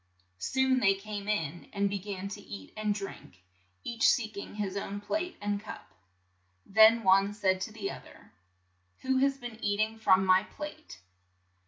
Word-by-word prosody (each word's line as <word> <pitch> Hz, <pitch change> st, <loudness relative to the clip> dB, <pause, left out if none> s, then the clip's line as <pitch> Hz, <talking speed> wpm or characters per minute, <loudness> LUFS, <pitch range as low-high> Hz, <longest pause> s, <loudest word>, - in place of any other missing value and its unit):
Soon 260 Hz, -, +2 dB
they 195 Hz, -5 st, +4 dB
came 205 Hz, 0 st, -6 dB
in, 170 Hz, -6 st, -2 dB
and 200 Hz, -1 st, +1 dB
be 200 Hz, 0 st, -2 dB
gan 195 Hz, 0 st, -5 dB
to 205 Hz, +1 st, -7 dB
eat 95 Hz, -, -10 dB
and 215 Hz, -1 st, -1 dB
drink, 195 Hz, -, -7 dB, 0.4 s
each 230 Hz, -1 st, +3 dB
seek 215 Hz, -4 st, +1 dB
ing 200 Hz, -, -7 dB
his 200 Hz, -2 st, -3 dB
own 200 Hz, 0 st, -4 dB
plate 330 Hz, -, -3 dB
and 205 Hz, 0 st, -2 dB
cup. 215 Hz, -, -10 dB, 0.7 s
Then 220 Hz, +3 st, +6 dB
one 195 Hz, +1 st, +4 dB
said 190 Hz, -3 st, +1 dB
to 205 Hz, -, -3 dB
the 215 Hz, -2 st, -4 dB
oth -, -, -10 dB
er, -, -, -17 dB, 0.7 s
"Who 265 Hz, 0 st, +1 dB
has 275 Hz, 0 st, +2 dB
been 240 Hz, -3 st, -9 dB
eat 205 Hz, 0 st, 0 dB
ing 220 Hz, +1 st, 0 dB
from 190 Hz, -3 st, +4 dB
my 185 Hz, 0 st, +6 dB
plate? 210 Hz, -, -9 dB
205 Hz, 175 wpm, -30 LUFS, 195-220 Hz, 0.7 s, Then